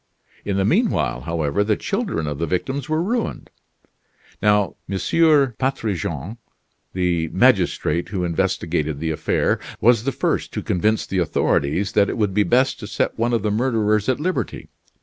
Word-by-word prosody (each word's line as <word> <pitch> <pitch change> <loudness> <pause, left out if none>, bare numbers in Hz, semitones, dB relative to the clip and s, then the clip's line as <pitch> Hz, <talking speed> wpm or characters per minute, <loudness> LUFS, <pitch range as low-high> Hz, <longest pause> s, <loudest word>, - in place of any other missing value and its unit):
In 100 -1 -2
the 95 - +2
mean 215 - +3
while, - - -1
however, 80 +4 -1
the 105 0 +1
children 80 - -2
of 75 -1 -4
the 85 - -1
victims 130 - -2
were 155 +2 +1
ruined. 230 +4 -3 0.9
Now, 105 -1 +2
M. 100 - -1 0.6
Patrigent, 105 - -2 0.5
the 90 -3 0
magistrate 85 +2 +2
who 95 -2 -2
investigated 80 -3 -1
the 80 +1 -2
affair, 80 - 0 0.2
was 115 -1 +4
the 135 - 0
first - - -1
to - - -3
convince 110 +5 +1
the 95 - -2
authorities 85 +2 0
that 100 -1 +3
it - - -3
would 105 -4 0
be 105 - +3
best 130 +5 +2
to 105 - -7
set 110 - -2
one 120 +1 +1
of 115 -4 0
the 105 - 0
murderers 110 -2 +1
at 130 - +1
liberty. 180 +4 -3
105 Hz, 165 wpm, -21 LUFS, 85-120 Hz, 0.9 s, was